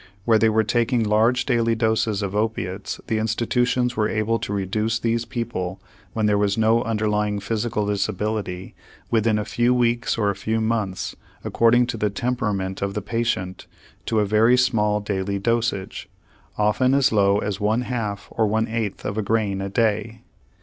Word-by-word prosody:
Where 115 -2 +4
they 110 - +4
were 110 0 +2
taking 120 +2 +1
large 110 +4 +2
daily 115 -3 +1
doses 110 -2 0
of 100 0 -3
opiates 105 -3 -2
the 110 -1 -1
institutions 125 +2 0
were 105 -1 +1
able 110 +1 0
to 105 - -5
reduce 105 +3 -1
these 115 0 -1
people, 105 -6 -4 0.3
when 110 -1 0
there 105 -1 +2
was 100 0 +1
no 110 +1 +3
underlying 105 -2 0
physical 105 +1 -2
disability, 100 -2 -2 0.4
within 110 -1 +2
a 105 - -2
few 120 +3 +1
weeks 120 -1 +1
or 105 -2 +2
a - - -6
few 110 +3 -1
months, 110 -4 -2 0.3
according 120 +1 +3
to 120 -1 -4
the 105 -1 0
temperament 100 -4 -2
of 100 0 -2
the 105 - -1
patient, 105 -5 -2 0.4
to 110 - 0
a 105 - +2
very 110 +4 +4
small 105 -4 +2
daily 100 -1 -2
dosage, 115 -2 -2 0.5
often 125 +6 +2
as 140 0 +3
low 100 -1 +3
as 105 -1 -3
one 110 +3 +1
half 115 -5 -4
or 110 - +1
one 110 +2 0
eighth 110 -3 -3
of 100 +2 -2
a - - +1
grain 105 -2 0
a 100 - -3
day. 110 +1 -1
110 Hz, 170 wpm, -23 LUFS, 100-115 Hz, 0.5 s, Where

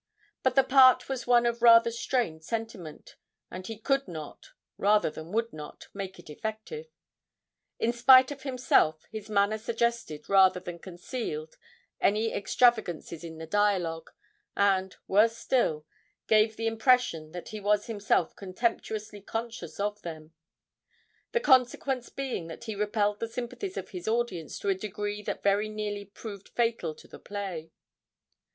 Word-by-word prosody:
But 260 -1 +1
the 270 - +6
part 255 -2 +6
was 265 -2 -4
one 240 -1 +5
of 235 0 0
rather 230 0 +7
strained 230 -8 -1
sentiment, 220 -6 -6 0.3
and 185 0 -7
he 225 - -6
could 275 +5 0
not, 155 - -8 0.3
rather 210 -4 +3
than 160 +2 -9
would 230 +2 -1
not, 150 -1 -10
make 195 -1 -6
it - - -14
effective. 220 - -6 0.9
In 235 - +1
spite 255 +2 +7
of 280 -1 -7
himself, 250 - +2
his 215 -1 -7
manner 205 +1 +2
suggested 230 -9 -2
rather 190 -2 +5
than 175 -1 -8
concealed 175 -3 -6 0.4
any 215 +3 +2
extravagances 200 -7 +1
in 165 -1 -8
the 160 - -7
dialogue, 175 -4 0 0.5
and, 190 -2 +2
worse 225 +4 +4
still, 155 -15 0 0.4
gave 215 0 +4
the 225 - -3
impression 225 - +2
that 175 - -7
he 215 - -6
was 205 0 +1
himself 205 -6 0
contemptuously 210 +1 -3
conscious 225 -4 -6
of 205 +1 -2
them; 160 -1 -8 1.0
the 475 - +2
consequence 260 - +2
being 265 -11 -4
that 165 - -9
he 220 -2 -4
repelled 210 0 0
the 230 - -2
sympathies 250 - -5
of - - -5
his 180 -1 -7
audience 220 -9 -1
to 200 - -2
a - - +4
degree 205 +1 -4
that - - -5
very 200 +2 +2
nearly 210 -1 -4
proved 200 0 -10
fatal 230 -9 -1
to - - -16
the - - -12
play. 190 -6 -6
210 Hz, 150 wpm, -28 LUFS, 185-235 Hz, 1.0 s, rather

